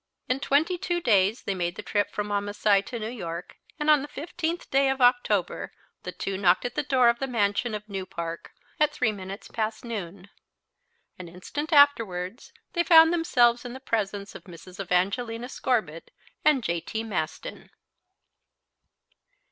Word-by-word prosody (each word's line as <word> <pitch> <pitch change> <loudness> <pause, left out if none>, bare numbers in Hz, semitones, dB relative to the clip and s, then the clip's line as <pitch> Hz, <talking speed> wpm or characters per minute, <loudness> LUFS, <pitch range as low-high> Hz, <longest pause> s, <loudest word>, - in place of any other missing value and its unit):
In 255 +1 0
twenty 315 +6 +1
two 350 0 -1
days 210 - +2
they 200 - -1
made 175 -1 -2
the - - -7
trip 205 -1 0
from 210 0 -4
Wamasai 205 0 +1
to 245 - -5
New 215 -1 -4
York, 170 -6 -7 0.2
and 300 - -2
on 300 -2 +6
the 290 - -6
15th 335 +3 -4
day 275 0 +3
of 265 0 -1
October 245 -7 +2 0.3
the - - -6
two 195 -1 -4
knocked 185 +1 +3
at 245 - -3
the - - 0
door 260 -3 +3
of 235 0 +3
the 270 - -2
mansion 220 -1 0
of 210 0 -7
New 195 -2 -5
Park, 170 0 -6 0.3
at 300 0 +3
three 250 -6 0
minutes 195 0 -8
past 220 +1 -3
noon. 200 -3 -7 0.9
An 180 - -8
instant 240 - -6
afterwards 230 - +3 0.2
they 345 - +2
found 325 -1 +7
themselves 245 -8 +3
in 245 -1 -7
the 260 - -8
presence 205 -5 -3
of - - -11
Mrs. 180 +1 -13
Evangelina 200 +6 -1
Scorbitt 215 - -2 0.3
and 295 -5 +4
J. 170 -4 -1
T. 220 +5 -4
Maston. 180 -8 -5
220 Hz, 165 wpm, -26 LUFS, 195-265 Hz, 0.9 s, found